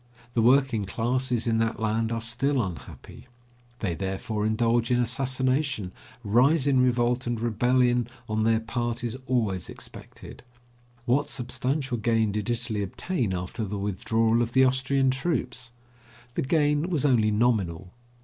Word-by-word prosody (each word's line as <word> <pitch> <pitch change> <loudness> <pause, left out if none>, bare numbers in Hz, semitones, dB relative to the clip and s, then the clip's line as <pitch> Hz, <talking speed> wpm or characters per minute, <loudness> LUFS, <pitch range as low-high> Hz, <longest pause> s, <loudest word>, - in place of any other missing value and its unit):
The 115 - +2
working 125 -3 +3
classes 120 +4 0
in 115 -1 +1
that 115 0 0
land 110 +1 0
are 115 -1 -2
still 130 +4 +1
unhappy. 95 +6 -9 0.5
They 95 -5 -1
therefore 100 +4 -2
indulge 115 +1 +1
in 125 -1 +2
assassination, 130 -2 0 0.3
rise 130 +8 +3
in 135 -3 +3
revolt, 125 0 +1
and 120 -2 -1
rebellion 120 +1 +2 0.2
on 110 0 -1
their 110 0 +2
part 120 +1 -3
is 120 0 -3
always 110 -8 0
expected. - - -11 0.6
What 130 +5 +1
substantial 130 +1 -2
gain 110 -1 +1
did 105 +2 -3
Italy 120 -3 -1
obtain 115 - -2
after 90 +5 -4
the 105 0 -4
withdrawal 110 +4 +1
of 120 0 -2
the 130 - +5
Austrian 130 +1 +2
troops? 130 -4 -2 0.6
The - - -1
gain 150 +3 +1
was 155 -6 0
only 115 -6 +3
nominal. 100 -6 0
120 Hz, 140 wpm, -26 LUFS, 110-130 Hz, 0.6 s, the